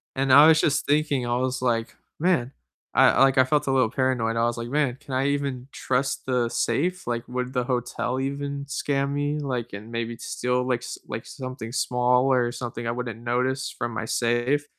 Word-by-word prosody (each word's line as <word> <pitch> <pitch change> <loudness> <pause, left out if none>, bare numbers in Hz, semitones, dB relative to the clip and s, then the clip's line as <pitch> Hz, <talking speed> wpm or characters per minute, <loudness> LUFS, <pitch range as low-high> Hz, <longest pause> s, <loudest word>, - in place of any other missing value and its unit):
and 135 0 +1
I 145 +3 +9
was 160 0 +6
just 145 -1 +1
thinking, 145 -3 +1
I 120 0 0
was 130 0 -1
like, 115 -2 0 0.2
"Man" 160 -7 +1 0.4
I - - +5
like, 135 0 +4
I 130 - +8
felt 145 +3 +1
a - - +2
little 130 -4 +3
paranoid, 125 -3 0
I 115 - +1
was 120 0 0
like, 115 0 -4
"Man, 135 -1 0
can 135 - -9
I 135 +2 +1
even 140 -3 -2
trust 135 +2 -1
the 125 -2 +1
safe, 175 +12 -1
like, 120 -1 -2
would 125 +1 -3
the 125 - +1
hotel 125 0 -2
even 140 +1 -3
scam 140 0 -1
me, 145 +1 -1
like, 125 -6 -3
and 105 +3 -8
maybe 115 0 -3
steal, 125 +1 -2
like, 125 -2 0
s - - -6
like, 110 +1 -5
something 130 -3 -7
small, 125 0 +2
or 125 -2 +2
something 120 -1 -6
I 115 - 0
wouldn't 120 -2 -5
notice 130 +2 -1
from 120 -1 -3
my 110 - -3
safe," 120 +6 +1
125 Hz, 205 wpm, -25 LUFS, 120-140 Hz, 0.4 s, I